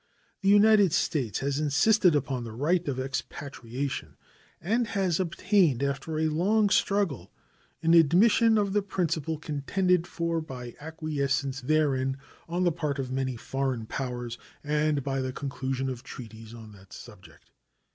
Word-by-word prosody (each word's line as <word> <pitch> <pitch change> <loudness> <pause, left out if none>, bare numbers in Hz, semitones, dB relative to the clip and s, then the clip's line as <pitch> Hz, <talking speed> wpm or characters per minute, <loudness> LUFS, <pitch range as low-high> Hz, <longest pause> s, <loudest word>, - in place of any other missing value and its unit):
The 195 - +2
United 205 -3 +6
States 130 - 0
has 140 +1 -1
insisted 170 +5 +3
upon 135 -3 -1
the 115 -2 -7
right 165 +8 0
of 135 -3 -2
expatriation, 135 -1 -5 0.4
and 225 +7 0
has 190 -5 0
obtained, 185 - +2
after 140 +3 -2
a 160 - +1
long 200 +7 +2
struggle, 195 - +1 0.5
an 165 +1 +4
admission 205 +8 +5
of 200 -2 0
the 205 - +3
principle 165 -5 -2
contended 170 +4 0
for 170 -2 -2
by 125 -5 -8
acquiescence 140 -4 -2
therein 135 -2 +1 0.3
on 175 +2 0
the 175 - +3
part 150 -3 -2
of 130 -2 -4
many 130 -1 -1
foreign 130 -1 -3
powers 125 -1 -5 0.2
and 150 -1 0
by 135 0 -1
the 130 0 -2
conclusion 135 -1 -3
of 130 -2 -4
treaties 115 -2 -10
on 115 -2 -11
that 95 -2 -16
subject. - - -14
145 Hz, 145 wpm, -27 LUFS, 130-175 Hz, 0.5 s, United